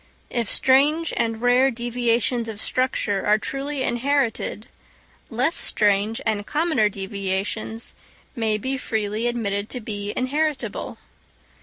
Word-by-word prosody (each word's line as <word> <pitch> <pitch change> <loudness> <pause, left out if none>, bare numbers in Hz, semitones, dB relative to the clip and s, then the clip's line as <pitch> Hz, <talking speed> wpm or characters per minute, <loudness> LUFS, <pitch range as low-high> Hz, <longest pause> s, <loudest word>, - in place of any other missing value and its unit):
If 235 -5 -1
strange 295 +5 +3
and 225 0 -1
rare 250 +2 +5
deviations 240 -1 0
of 220 -2 -6
structure 220 -6 0
are 210 +1 +4
truly 275 +4 -3
inherited, 240 -4 0 0.6
less 255 +8 +1
strange 210 +1 +2
and 215 -2 0
commoner 300 -9 +2
deviations 200 +3 -3 0.4
may 220 -3 +1
be 260 +5 -2
freely 220 0 -1
admitted 210 -4 -1
to 250 - -3
be 205 -2 -4
inheritable. 290 +2 -1
230 Hz, 115 wpm, -23 LUFS, 210-260 Hz, 0.6 s, rare